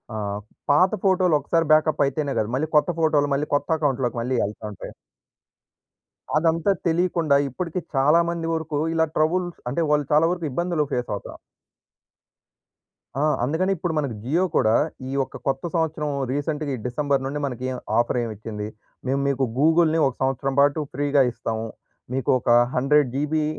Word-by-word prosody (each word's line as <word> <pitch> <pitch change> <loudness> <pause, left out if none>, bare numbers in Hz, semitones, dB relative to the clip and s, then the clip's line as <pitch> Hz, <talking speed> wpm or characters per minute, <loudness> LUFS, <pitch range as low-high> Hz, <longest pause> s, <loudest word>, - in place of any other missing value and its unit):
ఆహ్, 100 -1 -3 0.3
పాత 180 +6 +4
ఫోటో‌లు 185 -3 +3
ఒక్కసారి 165 +4 0
బ్యాకప్ 155 -1 +3
అయితేనే 140 +1 -2
గాదు. 110 +1 -1
మళ్ళీ 150 +4 -1
కొత్త 150 +3 +4
ఫోటో‌లు, 150 -3 +2
మళ్ళీ 150 +2 -1
కొత్త 145 - -1
అకౌంట్‌లోకి 135 -5 0
మళ్ళీ 125 +1 -1
ఎళ్తా 105 +1 -7
ఉంటాయి. - - -9 1.4
అదంతా 165 +4 +2 0.2
తెలియకుండా 165 -3 +2
ఇప్పటికి 170 +6 -4 0.2
చాలా 145 +5 +4
మంది 170 -1 -3
వరకు 160 -2 -3
ఇలా 160 0 +3
ట్రబుల్ 175 +4 +1 0.2
అంటే, 155 +7 -1
వాళ్ళు 150 -1 +2
చాలా 155 +2 +5
వరకు 175 -2 -3
ఇబ్బందులు 170 +1 0
ఫేస్ 125 0 -2
అవుత 100 - -8 1.9
ఆ! - - +1 0.2
అందుకని 160 +9 0
ఇప్పుడు 175 -1 -3
మన 150 -2 +1 0.2
జియో 155 +9 +1
కూడా. 110 +1 +3 0.3
ఈ - - -5
యొక్క 135 - -3
కొత్త 135 0 -1
సంవత్సరం 160 -2 -1 0.2
రీసెంట్‌గా 145 +1 -2
ఈ - - -7
డిసెంబర్ 135 +2 0
నుండి 140 +2 -3
మనకీ 130 -1 -4 0.3
ఆఫర్ 120 +1 +1
ఏం 115 - -3
ఇచ్చింది. 105 0 -6 0.4
మేము 135 +2 +1
మీకు 135 -1 0
గూగుల్‌నీ 160 +2 +4
ఒక 135 - -3
సంవత్సరం 135 +1 0
పాటు 145 +2 +4
ఫ్రీ‌గా 145 0 +2
ఇస్తాము. 115 -1 -4 0.5
మీకు 130 -2 -2
ఒక - - -3 0.3
100జీబీ 145 +3 +2
145 Hz, 155 wpm, -23 LUFS, 130-160 Hz, 1.9 s, చాలా